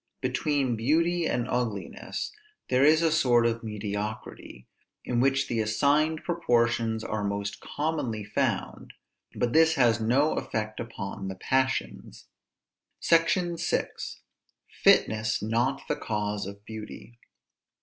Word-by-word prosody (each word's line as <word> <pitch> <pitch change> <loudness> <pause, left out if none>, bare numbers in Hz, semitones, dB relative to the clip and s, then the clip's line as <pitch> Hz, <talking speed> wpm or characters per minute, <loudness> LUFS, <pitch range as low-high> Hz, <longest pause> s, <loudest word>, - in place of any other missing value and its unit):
Between 130 0 0
beauty 165 +8 +1
and 120 0 -1
ugliness 115 -7 -3 0.4
there 130 +1 +3
is 155 +3 +5
a 165 - +3
sort 125 -7 +4
of 115 0 0
mediocrity, 105 - -6 0.4
in 120 -1 0
which 135 +1 +2
the 115 - -1
assigned 145 +9 +2
proportions 115 -8 +1
are 110 -1 -3
most 100 0 -3
commonly 145 -8 -3
found; 105 - -2 0.4
but 120 - 0
this 160 0 +5
has 115 -5 +3
no 130 +7 +3
effect 110 -1 -4
upon 100 -4 -6
the 95 - -5
passions. 130 +6 -2 0.7
SECTION 170 +1 +2
VI. - - 0 0.9
FITNESS 110 -1 +3
NOT 120 +5 0
THE - - -1
CAUSE 105 -2 -2
OF 100 +1 -10
BEAUTY. 110 +2 -9
120 Hz, 120 wpm, -27 LUFS, 110-145 Hz, 0.9 s, is